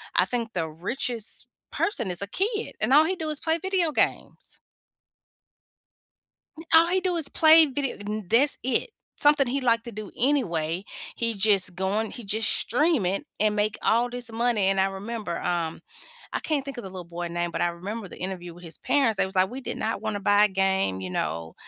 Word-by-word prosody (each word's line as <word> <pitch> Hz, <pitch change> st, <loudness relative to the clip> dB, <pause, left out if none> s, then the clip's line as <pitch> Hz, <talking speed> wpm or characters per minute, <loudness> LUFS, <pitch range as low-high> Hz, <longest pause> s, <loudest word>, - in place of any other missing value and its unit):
I -, -, +4 dB
think 235 Hz, -2 st, -3 dB
the 165 Hz, -3 st, -1 dB
richest 225 Hz, +7 st, -4 dB, 0.2 s
person 235 Hz, -, -1 dB
is 180 Hz, -, -5 dB
a 200 Hz, -, -3 dB
kid 420 Hz, -, -2 dB
and 260 Hz, -, +2 dB
all 305 Hz, +2 st, +7 dB
he 370 Hz, +3 st, -1 dB
do 320 Hz, -3 st, -4 dB
is 305 Hz, -1 st, -4 dB
play 320 Hz, 0 st, 0 dB
video 370 Hz, -2 st, 0 dB
games. -, -, -1 dB, 2.0 s
N 320 Hz, -, -10 dB
All 330 Hz, +1 st, +7 dB
he 375 Hz, +2 st, +2 dB
do 365 Hz, -1 st, -1 dB
is 325 Hz, -4 st, -2 dB
play 320 Hz, 0 st, +7 dB
video 275 Hz, -1 st, -3 dB
and 210 Hz, -2 st, -5 dB
that's 270 Hz, +6 st, +4 dB
it. 260 Hz, -, 0 dB, 0.3 s
Something 290 Hz, -3 st, +4 dB
he 270 Hz, +2 st, -1 dB
like 230 Hz, -2 st, +2 dB
to 235 Hz, -, -8 dB
do 215 Hz, -2 st, -8 dB
anyway. 185 Hz, -, 0 dB, 0.3 s
He 230 Hz, -1 st, -1 dB
just 195 Hz, -3 st, +2 dB
going 200 Hz, +4 st, -1 dB
he 240 Hz, -, -8 dB
just 215 Hz, +2 st, +1 dB
stream 295 Hz, -, +2 dB
it 195 Hz, +10 st, -1 dB
and 210 Hz, 0 st, +2 dB
make 210 Hz, 0 st, 0 dB
all 235 Hz, +2 st, +2 dB
this 245 Hz, -1 st, -6 dB
money. 230 Hz, -2 st, +1 dB
And 195 Hz, 0 st, +2 dB
I 190 Hz, -, +4 dB
remember, 205 Hz, 0 st, -5 dB
um, 170 Hz, -2 st, -2 dB, 0.5 s
I -, -, +1 dB
can't 290 Hz, -4 st, -2 dB
think 275 Hz, -2 st, -7 dB
of 240 Hz, -, -6 dB
the 190 Hz, -, -7 dB
little 185 Hz, -1 st, -7 dB
boy 175 Hz, +1 st, -5 dB
name, 175 Hz, 0 st, -2 dB
but -, -, -3 dB
I -, -, +3 dB
remember 195 Hz, +5 st, -6 dB
the -, -, -12 dB
interview 180 Hz, -2 st, -6 dB
with 175 Hz, -, -14 dB
his 165 Hz, -1 st, -7 dB
parents. 245 Hz, -7 st, +1 dB
They 195 Hz, -, +2 dB
was 190 Hz, +1 st, -9 dB
like, 185 Hz, +1 st, +3 dB
"We 265 Hz, +2 st, -6 dB
did -, -, -5 dB
not 220 Hz, -2 st, -2 dB
wanna 215 Hz, -2 st, -3 dB
buy 205 Hz, +1 st, +4 dB
a -, -, +3 dB
game, 190 Hz, -, 0 dB
you 95 Hz, -, -5 dB
know. 80 Hz, 0 st, -3 dB
215 Hz, 210 wpm, -26 LUFS, 190-270 Hz, 2.0 s, all